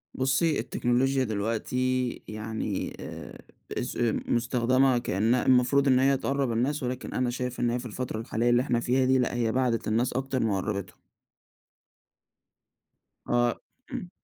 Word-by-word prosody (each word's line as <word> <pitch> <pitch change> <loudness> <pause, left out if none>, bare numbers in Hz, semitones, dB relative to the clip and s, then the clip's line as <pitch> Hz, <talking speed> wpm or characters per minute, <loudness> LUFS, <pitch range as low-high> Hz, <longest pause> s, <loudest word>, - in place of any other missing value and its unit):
بُصّي، 140 +4 +1
التكنولوجيا 130 +2 +1
دلوقتي 125 +4 -1 0.2
يعني 110 -2 -4
آآ، - - -8 0.3
اس - - -3 0.3
مستخدمة 125 +2 +2
كأنها 115 +1 +1
المفروض 130 +2 +4
إن 130 -1 +5
هي 135 0 +3
تقرًّب 135 -2 -1
الناس، 130 +5 0
ولكن 125 +1 -4
أنا 125 -1 0
شايف 125 0 -4
إن 120 -1 +2
هي 120 - -1
في 125 - -9
الفترة 120 0 -4
الحالية 115 +1 0
اللي 120 0 +4
إحنا 120 -3 0
فيها 130 +2 +1
دي 130 0 +4
لأ، 125 - 0
هي 115 -2 +1
بعدِت 125 -3 0
الناس 115 +3 +1
أكتر 130 0 -1
ما 110 -3 +1
قربتّهم. 100 -1 -4 2.3
آه 120 -1 +2 0.3
امم. 245 -9 -5
125 Hz, 145 wpm, -27 LUFS, 115-130 Hz, 2.3 s, إن